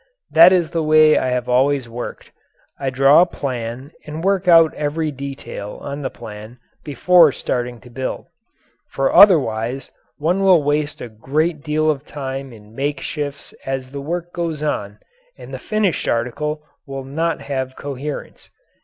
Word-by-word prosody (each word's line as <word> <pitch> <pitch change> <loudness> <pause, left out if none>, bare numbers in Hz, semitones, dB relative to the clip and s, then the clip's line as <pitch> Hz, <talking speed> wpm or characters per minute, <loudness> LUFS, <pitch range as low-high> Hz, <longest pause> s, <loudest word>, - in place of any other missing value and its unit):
That 170 +3 +8
is 175 -3 +2
the 165 - -1
way 155 0 +5
I - - +1
have 125 -1 -1
always 130 +1 +2
worked. 120 +1 -8 0.5
I 135 - -1
draw 135 +4 +5
a - - +5
plan 130 -2 -5
and 155 +2 -7
work 195 -1 +1
out 165 -2 +6
every 150 +1 -2
detail 135 -7 -7
on 140 +1 -6
the 130 - -3
plan 110 0 -10 0.3
before 165 +2 +4
starting 125 -2 -3
to 125 - -15
build. 130 +2 -4 0.6
For 135 0 -1
otherwise 130 - +4 0.3
one 175 +6 0
will 185 -5 +5
waste 145 +1 -1
a - - -5
great 145 +8 -2
deal 155 +1 0
of 140 -2 -5
time 135 -2 -6
in 105 -2 -15
makeshifts 145 +2 -4
as 135 -1 -4
the 140 0 -6
work 175 +4 -4
goes 165 -4 -3
on 105 -9 -3 0.4
and - - -11
the - - -5
finished 215 -6 -1
article 150 +6 -2 0.2
will 135 -1 -6
not 160 +5 -2
have 130 -2 -4
coherence. 140 +1 -7
140 Hz, 155 wpm, -20 LUFS, 130-155 Hz, 0.6 s, That